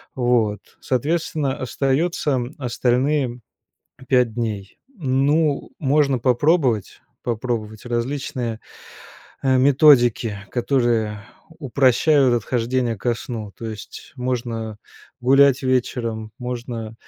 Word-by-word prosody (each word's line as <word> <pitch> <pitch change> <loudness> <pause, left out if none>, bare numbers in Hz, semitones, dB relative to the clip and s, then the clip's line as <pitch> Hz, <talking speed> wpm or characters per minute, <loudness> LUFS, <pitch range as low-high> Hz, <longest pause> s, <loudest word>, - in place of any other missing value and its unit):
Вот. 120 -5 0
Соответственно, 145 +1 -1
остается 135 +1 0 0.2
остальные 125 +1 0 0.7
5 125 -3 +3
дней. 105 -4 -4 0.2
Ну, 145 0 +1
можно 140 -2 +2
попробовать 125 - +1 0.2
попробовать 115 -2 -3
различные, 120 -1 -3 0.8
э, 130 -1 +3
методики, 130 -6 +4
которые 120 -5 0 0.3
упрощают 140 -2 +3
отхождение 120 +1 0
ко 120 +4 0
сну. 110 -3 -7
То 115 - -6
есть, 110 -2 -9
можно 115 -4 -3 0.4
гулять 135 +1 +5
вечером, 115 -4 -1
можно 120 -3 -5
125 Hz, 85 wpm, -21 LUFS, 115-135 Hz, 0.8 s, гулять